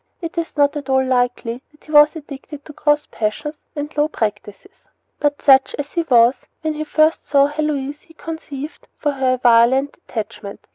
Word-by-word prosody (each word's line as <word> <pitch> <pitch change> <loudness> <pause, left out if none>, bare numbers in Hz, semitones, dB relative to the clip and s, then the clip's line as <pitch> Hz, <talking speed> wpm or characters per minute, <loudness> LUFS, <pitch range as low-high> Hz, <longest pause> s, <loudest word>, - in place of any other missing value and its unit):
It 335 -2 -6
is 335 -2 -4
not 285 +1 +3
at 285 -2 -6
all 265 0 +3
likely 245 -1 -1
that 300 - -26
he 305 - -13
was 295 +1 +6
addicted 290 -1 -10
to 305 - -11
gross 295 0 +1
passions 295 +8 -3 0.2
and 295 +1 -5
low 295 0 +2
practices. 210 - -4 0.5
But 290 -1 -1
such 270 -2 +5
as 290 0 -5
he 340 - +1
was, 250 -4 +3
when 315 -1 -1
he 305 0 -4
first 310 +1 +2
saw 280 -1 +4
Heloise 295 -1 -2
he 325 - -21
conceived 310 -2 -8
for 295 - 0
her 265 -2 +1
a - - -1
violent 245 +3 +3
attachment. 215 -2 -6
285 Hz, 185 wpm, -19 LUFS, 255-305 Hz, 0.5 s, was